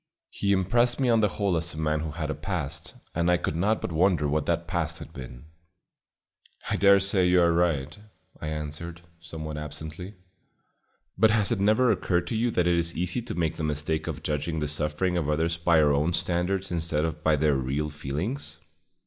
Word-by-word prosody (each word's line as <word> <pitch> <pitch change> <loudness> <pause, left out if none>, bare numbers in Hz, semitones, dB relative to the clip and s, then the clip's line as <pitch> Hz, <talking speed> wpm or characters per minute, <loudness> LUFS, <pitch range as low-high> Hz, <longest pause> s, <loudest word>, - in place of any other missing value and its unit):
He 100 - -1
impressed 120 +7 +2
me 130 -2 +2
on 115 -1 +4
the 105 - +4
whole 100 -2 -1
as 85 -1 -2
a - - -9
man 75 -1 0
who 80 0 -3
had 75 0 -3
a - - -1
past, 75 -1 -4 0.2
and 85 +1 +1
I 90 - +4
could 80 - -3
not 105 +6 +1
but - - -4
wonder 85 -2 +2
what 75 0 -1
that - - 0
past - - -2
had - - -11
been. 65 0 -9 1.3
"I - - +2
dare 100 0 +6
say 95 -2 +3
you 90 0 +4
are 85 -1 +4
right," 75 -4 +1 0.5
I 80 - -4
answered, 75 +2 -5 0.2
somewhat 80 -1 -6
absently, 80 +6 -7 1.0
"but 110 +2 +6
has 105 0 +2
it 115 - +1
never 110 +5 +4
occurred 90 -4 0
to - - -2
you 120 +2 +1
that 90 -6 +1
it 85 -1 +3
is 85 0 -1
easy 90 +8 0
to 120 - -6
make 80 -3 -1
the 80 - -4
mistake 75 +1 -2
of 80 -2 -5
judging 80 +2 -2
the 75 - -1
suffering 75 +4 0
of 75 -4 -1
others 80 +2 0
by 85 -1 +3
our 75 -2 +4
own 75 +5 +1
standards 90 +3 -1
instead 80 -2 0
of 80 -1 -4
by 80 -1 +4
their 75 0 +2
real 70 +3 -1
feelings? 75 - -4
85 Hz, 205 wpm, -27 LUFS, 75-95 Hz, 1.3 s, dare